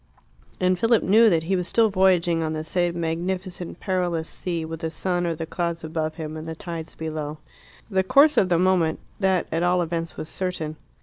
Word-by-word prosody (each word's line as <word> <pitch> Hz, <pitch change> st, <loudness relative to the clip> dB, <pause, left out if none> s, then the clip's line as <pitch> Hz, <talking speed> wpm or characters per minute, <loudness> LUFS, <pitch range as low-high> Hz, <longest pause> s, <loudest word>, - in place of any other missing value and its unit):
And 185 Hz, 0 st, +2 dB
Philip 230 Hz, +1 st, +3 dB
knew 220 Hz, +4 st, +6 dB
that 165 Hz, -4 st, +2 dB
he 190 Hz, +4 st, 0 dB
was 180 Hz, -1 st, -1 dB
still 225 Hz, -2 st, +3 dB
voyaging 180 Hz, -3 st, +3 dB
on 160 Hz, -1 st, -1 dB
the 155 Hz, 0 st, -3 dB
same 175 Hz, +1 st, -1 dB
magnificent, 175 Hz, +2 st, -3 dB
perilous 175 Hz, -4 st, -1 dB
sea, 170 Hz, -3 st, -3 dB
with 165 Hz, 0 st, -6 dB
the 165 Hz, -1 st, -2 dB
sun 175 Hz, +1 st, -1 dB
or 165 Hz, -, -1 dB
the 160 Hz, +1 st, -4 dB
clouds 170 Hz, 0 st, -3 dB
above 155 Hz, -1 st, -3 dB
him, 155 Hz, -1 st, -6 dB
and 155 Hz, +1 st, -7 dB
the 160 Hz, -, -5 dB
tides 165 Hz, -1 st, -6 dB
below. 155 Hz, -1 st, -4 dB, 0.5 s
The 190 Hz, -3 st, +1 dB
course 280 Hz, +10 st, +5 dB
of 190 Hz, -6 st, +3 dB
the 175 Hz, -, +3 dB
moment 180 Hz, -3 st, +2 dB, 0.2 s
that, 190 Hz, -3 st, +2 dB
at 165 Hz, -, 0 dB
all 175 Hz, +1 st, +3 dB
events, 165 Hz, 0 st, -4 dB
was 155 Hz, -, -5 dB
certain. 160 Hz, -3 st, -3 dB
170 Hz, 200 wpm, -24 LUFS, 160-185 Hz, 0.5 s, knew